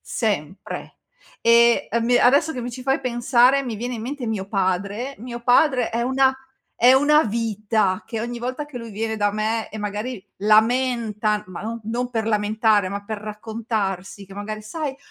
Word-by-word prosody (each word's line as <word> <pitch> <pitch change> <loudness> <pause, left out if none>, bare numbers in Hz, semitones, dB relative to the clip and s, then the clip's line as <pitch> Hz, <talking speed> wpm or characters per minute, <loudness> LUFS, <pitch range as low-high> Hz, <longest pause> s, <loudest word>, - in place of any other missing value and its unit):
sempre. 195 -6 -4 0.5
E 235 0 +5
a 235 - +1
mi 240 +2 +3
adesso 280 +6 +4
che 250 - -5
mi 245 - -4
ci 255 +1 -8
fai 270 +3 +1
pensare 250 +2 +3
mi 245 -4 -4
viene 245 +3 -4
in 225 - -6
mente 260 +1 -5
mio 200 -4 -3
padre. 200 +6 -1
Mio 240 +1 -7
padre 250 0 +3
è 230 - -1
una 265 +1 +3 0.5
è 250 +2 +8
una 300 +3 +5
vita 215 -2 0
che 225 - -4
ogni 240 +1 -4
volta 255 +5 -4
che 290 -4 -8
lui 230 -1 -8
viene 220 +2 -3
da 205 0 +2
me 215 +2 -1
e - - -9
magari 210 +1 -4
lamenta, 215 0 +2
ma 185 - -7
non 230 +2 -4
non 240 +3 -2
per 225 -2 -2
lamentare, 210 -1 +2
ma 200 +1 -5
per 215 +1 -5
raccontarsi 210 -3 -4
che 195 - -13
magari: 215 +1 -6
"Sai 280 +4 -4
225 Hz, 180 wpm, -22 LUFS, 210-245 Hz, 0.5 s, è